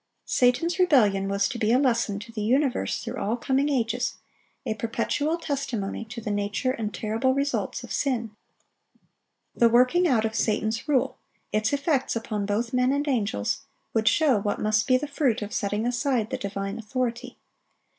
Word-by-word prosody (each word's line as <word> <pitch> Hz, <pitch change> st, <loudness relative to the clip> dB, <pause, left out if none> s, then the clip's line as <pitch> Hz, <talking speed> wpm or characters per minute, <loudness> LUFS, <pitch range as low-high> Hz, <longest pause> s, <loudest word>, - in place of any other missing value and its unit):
Satan's 330 Hz, +9 st, +2 dB
rebellion 210 Hz, -, +4 dB
was 200 Hz, 0 st, +1 dB
to 240 Hz, -, -5 dB
be 220 Hz, 0 st, +2 dB
a 245 Hz, -, +5 dB
lesson 235 Hz, -6 st, +1 dB
to 230 Hz, +2 st, -10 dB
the 220 Hz, -2 st, -4 dB
universe 260 Hz, +4 st, +1 dB
through -, -, -5 dB
all 220 Hz, +4 st, 0 dB
coming 270 Hz, +3 st, +1 dB
ages, 245 Hz, -3 st, 0 dB, 0.5 s
a -, -, 0 dB
perpetual 235 Hz, +8 st, -1 dB
testimony 265 Hz, -, -3 dB
to 230 Hz, +2 st, -7 dB
the 215 Hz, -2 st, -4 dB
nature 205 Hz, +5 st, -1 dB
and 220 Hz, -4 st, -3 dB
terrible 225 Hz, +5 st, 0 dB
results 280 Hz, +1 st, -1 dB
of -, -, -10 dB
sin. 235 Hz, -6 st, -1 dB, 1.2 s
The 235 Hz, -, +5 dB
working 255 Hz, +10 st, +4 dB
out 225 Hz, -6 st, +2 dB
of 220 Hz, -, -2 dB
Satan's 220 Hz, +1 st, 0 dB
rule, 275 Hz, -4 st, +1 dB, 0.3 s
its 215 Hz, +1 st, +1 dB
effects 280 Hz, -2 st, 0 dB
upon 215 Hz, -3 st, -3 dB
both 230 Hz, +4 st, -1 dB
men 250 Hz, +1 st, +3 dB
and 285 Hz, +2 st, 0 dB
angels, 205 Hz, -, 0 dB, 0.3 s
would 220 Hz, 0 st, +1 dB
show 280 Hz, -7 st, +4 dB
what 205 Hz, +1 st, -2 dB
must 215 Hz, +2 st, +1 dB
be 255 Hz, -1 st, +5 dB
the 295 Hz, -, -3 dB
fruit 280 Hz, -7 st, 0 dB
of 205 Hz, -, -7 dB
setting 205 Hz, +1 st, -1 dB
aside 245 Hz, -2 st, 0 dB
the -, -, -1 dB
divine 200 Hz, +2 st, -4 dB
authority. 245 Hz, +2 st, -3 dB
235 Hz, 170 wpm, -26 LUFS, 215-265 Hz, 1.2 s, a